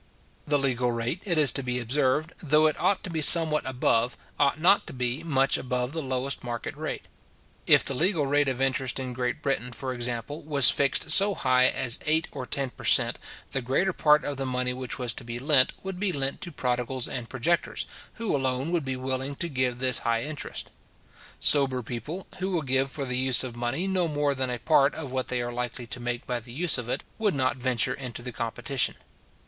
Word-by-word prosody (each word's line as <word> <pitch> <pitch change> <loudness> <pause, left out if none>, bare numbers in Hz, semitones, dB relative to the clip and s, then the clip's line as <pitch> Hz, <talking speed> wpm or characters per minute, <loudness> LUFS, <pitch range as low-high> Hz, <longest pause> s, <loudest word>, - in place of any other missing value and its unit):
The 145 -1 +2
legal 125 -3 0
rate, 120 +9 -3
it 170 -3 +1
is 145 -5 +6
to 135 - +3
be 125 -1 -3
observed, 135 +5 0
though 155 0 +3
it 155 - +1
ought 200 - +1
to 180 - -6
be 160 -1 -1
somewhat 155 -2 +6
above, 125 -1 +1 0.2
ought 140 +1 +2
not 185 +5 +4
to - - -8
be 125 +2 -1
much 135 -4 +1
above 125 0 -3
the 160 +1 -4
lowest 130 0 -2
market 120 -1 -5
rate. - - -5 0.6
If - - +5
the 140 - -1
legal 160 +2 +1
rate 145 +1 +2
of 130 -1 -3
interest 135 -2 0
in 130 -2 -5
Great 125 +3 -3
Britain, 130 -3 -1
for 130 +2 -4
example, 120 +5 -4
was 145 -4 +6
fixed 140 -1 +3
so 200 0 +6
high 130 -4 +3
as 125 -2 -1
eight 160 +1 +2
or 125 - -7
ten 135 -2 -2
per - - -14
cent. - - +5 0.3
the 135 - -2
greater 140 +10 0
part 150 -2 +3
of 145 -2 -4
the 135 - -2
money 125 0 -1
which 125 -1 -6
was 125 -3 -1
to - - -6
be 115 0 -6
lent, 135 0 +3
would 190 -1 -6
be 200 -1 +1
lent 140 -3 -2
to 175 - -7
prodigals 125 -2 -1
and 120 -2 -6
projectors, 150 +7 -1 0.3
who 230 -8 -2
alone 130 +3 -1
would 170 -3 0
be 130 -1 -3
willing 130 +2 -3
to 170 - -3
give 130 -5 -1
this 130 -1 +2
high 115 0 -1
interest. 150 -1 -6 0.7
Sober 135 -4 +5
people, 125 - -6
who 190 +1 -2
will 175 -4 -1
give 135 0 +1
for 140 +1 -5
the 125 -1 -1
use 130 -1 +4
of 125 -2 -7
money 120 +9 -2
no 185 -3 0
more 145 -2 0
than 130 -1 -2
a 125 - -3
part 140 +2 +2
of 145 -5 -6
what 130 -1 -2
they 125 -1 -2
are 120 0 -5
likely 120 0 -4
to 125 - -6
make 120 0 -4
by 125 -1 -2
the 120 +1 -12
use 160 -1 +2
of 120 -1 -6
it, - - -2 0.2
would 210 -6 +1
not 130 -1 0
venture 125 0 0
into 125 -3 -7
the 125 - -5
competition. 120 +3 -1
130 Hz, 220 wpm, -26 LUFS, 125-150 Hz, 0.7 s, is